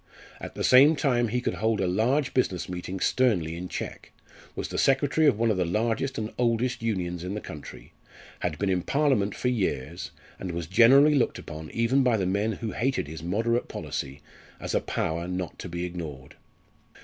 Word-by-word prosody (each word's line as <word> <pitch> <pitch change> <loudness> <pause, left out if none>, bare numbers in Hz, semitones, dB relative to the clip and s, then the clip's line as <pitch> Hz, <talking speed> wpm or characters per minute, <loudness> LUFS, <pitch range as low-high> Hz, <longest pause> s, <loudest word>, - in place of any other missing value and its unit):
At - - -8
the - - -3
same 140 +5 +7
time 125 -5 +1
he 125 +3 -1
could - - -1
hold 110 0 0
a 95 - +1
large 120 +10 +1
business 95 -9 0
meeting 90 +1 -5
sternly 90 -10 +1
in 90 +2 -5
check, - - -6 0.4
was - - -4
the - - -3
secretary 140 +3 +3
of 130 -7 +4
one 115 0 +2
of 100 - 0
the 90 - +2
largest 115 +8 -1
and 110 0 -4
oldest 120 +1 +1
Unions 90 -6 -2
in 95 +3 -4
the - - -2
country, 75 -7 -10 0.5
had - - -2
been 100 -1 0
in 90 -1 +1
Parliament 130 - +1
for 125 - 0
years, 95 - -2 0.3
and 90 -2 -5
was 85 -1 -3
generally 130 - +6
looked 140 -4 +1
upon 80 0 -8
even 115 +4 +2
by 125 -3 +3
the 95 - 0
men 100 +4 0
who 110 +1 -4
hated 130 - -1
his 80 +1 -7
"moderate" 115 +8 0
policy, 70 +2 -5 0.4
as - - -4
a - - +2
power 85 +2 -2
not 90 -1 -4
to 90 - -6
be 85 +1 -3
ignored. 75 -7 -7
105 Hz, 195 wpm, -27 LUFS, 90-125 Hz, 0.5 s, same